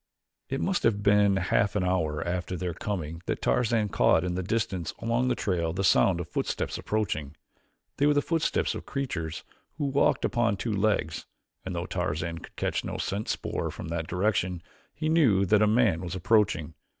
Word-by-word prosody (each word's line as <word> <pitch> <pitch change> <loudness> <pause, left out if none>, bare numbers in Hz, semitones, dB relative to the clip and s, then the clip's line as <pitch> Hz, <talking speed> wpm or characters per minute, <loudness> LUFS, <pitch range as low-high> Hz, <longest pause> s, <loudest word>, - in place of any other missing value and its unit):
It 135 - -2
must 190 -1 0
have 105 -3 +1
been 100 -1 +4
a - - 0
half 100 +2 +1
hour 90 -6 0
after 90 0 -2
their 90 0 -3
coming 85 -3 -4
that - - -1
Tarzan 115 -3 +1
caught 80 - +3
in 90 -1 -2
the 90 - -1
distance 95 -4 -2
along 115 +2 0
the 125 - +1
trail 85 -5 -1
the 95 +2 -2
sound 95 -1 +4
of 85 - -4
footsteps 90 - -2
approaching. 80 -9 -2 0.6
They 145 - +3
were 150 - +4
the 145 - +3
footsteps 165 -1 0
of - - -4
a - - -10
creature 130 - -3 0.5
who 150 - -1
walked 140 0 +2
upon 120 -4 +1
two 115 +2 -2
legs, 100 -5 0 0.4
and 95 -1 -5
though 85 +1 -2
Tarzan 85 -2 -2
could - - -13
catch - - -1
no - - -4
scent 100 +3 -3
spoor - - -2
from - - -7
that 85 -1 -3
direction 90 -2 0 0.3
he 155 - -3
knew 130 - +4
that 105 +2 +4
a 105 - +5
man 105 -7 +3
was 90 0 -5
approaching. 95 -5 +2
95 Hz, 190 wpm, -28 LUFS, 85-115 Hz, 0.6 s, a